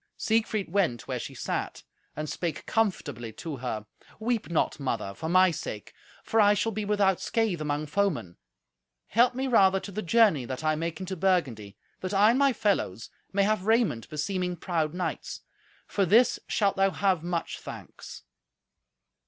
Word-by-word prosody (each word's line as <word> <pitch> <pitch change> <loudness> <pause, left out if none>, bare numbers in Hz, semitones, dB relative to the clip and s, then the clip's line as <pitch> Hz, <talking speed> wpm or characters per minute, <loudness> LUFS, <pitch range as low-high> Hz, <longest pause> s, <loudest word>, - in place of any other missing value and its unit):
Siegfried 220 -4 0
went 170 - 0
where - - -2
she - - -7
sat, - - -4 0.3
and 155 +1 -4
spake 165 0 -4
comfortably 145 - -1
to 155 +1 -6
her. 115 -4 -4 0.3
"Weep 230 -2 -1
not, 160 -1 0
mother, 130 -7 -2
for 160 +11 -5
my 185 +1 +5
sake, 105 -9 -6 0.3
for 225 - +1
I 205 0 +5
shall 225 +3 0
be 215 +1 -3
without 200 -2 +2
scathe 220 -8 0
among 150 0 -1
foemen. 150 - -1 0.7
Help 245 +2 +4
me 265 +1 -1
rather 195 -6 +5
to 200 - -8
the 210 +3 -3
journey 210 - +4
that 130 +4 -5
I 155 0 +2
make 160 +1 -3
into 190 0 -4
Burgundy, 140 - 0 0.2
that 185 +2 -3
I 210 +3 +6
and 250 - +1
my 280 -1 +5
fellows 195 - -1 0.2
may 200 0 +2
have 210 -1 0
raiment 220 - +2
beseeming 180 +4 -2
proud 165 -2 -2
knights. 180 -2 -4 0.4
For 200 - 0
this 220 +7 +4
shalt 200 -3 +1
thou 195 0 +4
have 190 -3 +1
much 170 0 -3
thanks." - - -10
185 Hz, 165 wpm, -28 LUFS, 155-210 Hz, 0.7 s, I